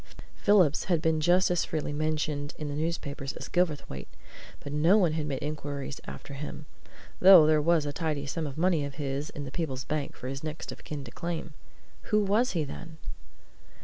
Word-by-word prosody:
Phillips 185 -8 +4
had 175 -4 +2
been 160 -1 +1
just 180 +3 +4
as 175 - +2
freely 150 -2 -3
mentioned 150 -1 -1
in 150 -1 -4
the - - -3
newspapers 145 -3 -3
as - - -7
Gilverthwaite; 150 - -1 0.5
but 145 - -7
no 165 +7 +5
one 180 -6 +3
had 155 -1 -2
made 135 -2 -3
inquiries 145 -2 -4
after 140 - -8
him, 150 +2 -6 0.5
though 185 -4 +9
there 155 -1 +4
was 165 -1 +3
a 145 - -3
tidy 150 -3 -2
sum 155 +2 -3
of 140 - -7
money 170 -2 +2
of 140 -1 -5
his 140 0 -3
in 145 - -6
the 135 - -7
Peebles 135 -4 -3
bank 150 +1 -3
for 125 - -7
his 135 +2 -5
next 155 0 -5
of - - -11
kin 150 -2 -5
to - - -10
claim. 170 -2 -4 0.5
Who 215 -1 +2
was 215 +6 +2
he, 165 -4 +1
then? 160 +3 -8
155 Hz, 195 wpm, -29 LUFS, 145-170 Hz, 0.5 s, though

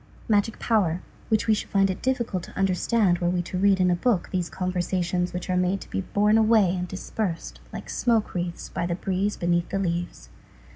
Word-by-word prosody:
Magic 215 0 +2
power 185 -7 +1 0.3
which 220 -1 +2
we 220 - +4
should 210 - -3
find 195 -1 +3
it 185 - -6
difficult 235 -8 -1
to - - -12
understand 195 0 +2
were 175 - +1
we 175 0 0
to 180 +1 -4
read 195 0 +4
in 180 -1 +3
a - - +3
book 200 0 0
these 180 -3 -1
conversations 180 -1 -1
which 180 0 -5
are 185 - 0
made 180 +2 +1
to - - -11
be - - -1
borne 210 +3 +2
away 215 -5 +4
and 180 0 -3
dispersed 190 -1 -4
like - - -7
smoke 230 -3 +1
wreaths 175 -1 -3
by 170 - -2
the 170 - -1
breeze 195 +3 -1
beneath 175 0 0
the 195 - -1
leaves. 175 -2 -3
185 Hz, 205 wpm, -25 LUFS, 175-210 Hz, 0.3 s, we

